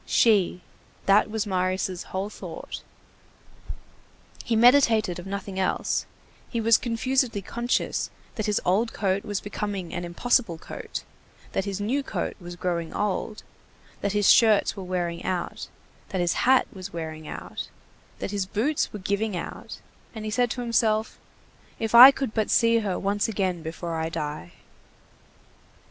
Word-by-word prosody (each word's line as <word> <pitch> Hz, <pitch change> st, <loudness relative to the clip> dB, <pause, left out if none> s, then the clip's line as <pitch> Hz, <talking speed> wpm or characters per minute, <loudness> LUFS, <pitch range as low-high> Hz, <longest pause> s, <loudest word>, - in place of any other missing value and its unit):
She—that 200 Hz, -1 st, +2 dB
was 220 Hz, 0 st, -2 dB
Marius' 185 Hz, -1 st, -1 dB
whole 195 Hz, +2 st, -4 dB
thought. -, -, -8 dB, 1.6 s
He 230 Hz, -, 0 dB
meditated 225 Hz, -6 st, +5 dB
of 175 Hz, -, -9 dB
nothing 195 Hz, -1 st, -4 dB
else; 190 Hz, -, 0 dB, 0.4 s
he 235 Hz, -, -2 dB
was 225 Hz, 0 st, +5 dB
confusedly 240 Hz, -2 st, 0 dB
conscious 235 Hz, +4 st, -1 dB, 0.2 s
that 215 Hz, -, -3 dB
his 210 Hz, -, +2 dB
old 210 Hz, +6 st, +2 dB
coat 195 Hz, -1 st, 0 dB
was 205 Hz, -2 st, -2 dB
becoming 205 Hz, -3 st, -4 dB
an 175 Hz, -, -3 dB
impossible 175 Hz, +1 st, +1 dB
coat, -, -, -7 dB, 0.4 s
and -, -, -24 dB
that 195 Hz, -, 0 dB
his 200 Hz, -1 st, -3 dB
new 240 Hz, +8 st, 0 dB
coat -, -, -3 dB
was 175 Hz, -1 st, -8 dB
growing 170 Hz, -2 st, -2 dB
old, 210 Hz, +1 st, -2 dB, 0.6 s
that 200 Hz, 0 st, -1 dB
his 205 Hz, -1 st, +2 dB
shirts 220 Hz, -3 st, +5 dB
were 195 Hz, -, -6 dB
wearing 175 Hz, -2 st, -3 dB
out, 180 Hz, -2 st, -3 dB, 0.4 s
that 190 Hz, -, -2 dB
his 175 Hz, -1 st, +2 dB, 0.2 s
hat 260 Hz, -1 st, +6 dB
was 190 Hz, 0 st, -8 dB
wearing 155 Hz, -2 st, -6 dB
out, -, -, -6 dB, 0.5 s
that -, -, -4 dB
his 200 Hz, -2 st, -2 dB
boots 245 Hz, +10 st, 0 dB
were -, -, -6 dB
giving 200 Hz, +1 st, -1 dB
out, -, -, -7 dB, 0.3 s
and 220 Hz, -1 st, -6 dB
he 215 Hz, -, -3 dB
said 245 Hz, +2 st, +2 dB
to 245 Hz, -, -3 dB
himself: 225 Hz, -2 st, +1 dB, 0.6 s
"If 225 Hz, 0 st, -3 dB
I 245 Hz, +3 st, +12 dB
could 270 Hz, -4 st, -2 dB
but 220 Hz, -2 st, 0 dB
see 230 Hz, 0 st, +4 dB
her 200 Hz, -4 st, -2 dB
once 205 Hz, +2 st, 0 dB
again 190 Hz, -5 st, -1 dB
before 165 Hz, +1 st, -5 dB
I 160 Hz, 0 st, -2 dB
die!" 150 Hz, -, -5 dB
200 Hz, 150 wpm, -26 LUFS, 180-225 Hz, 1.6 s, I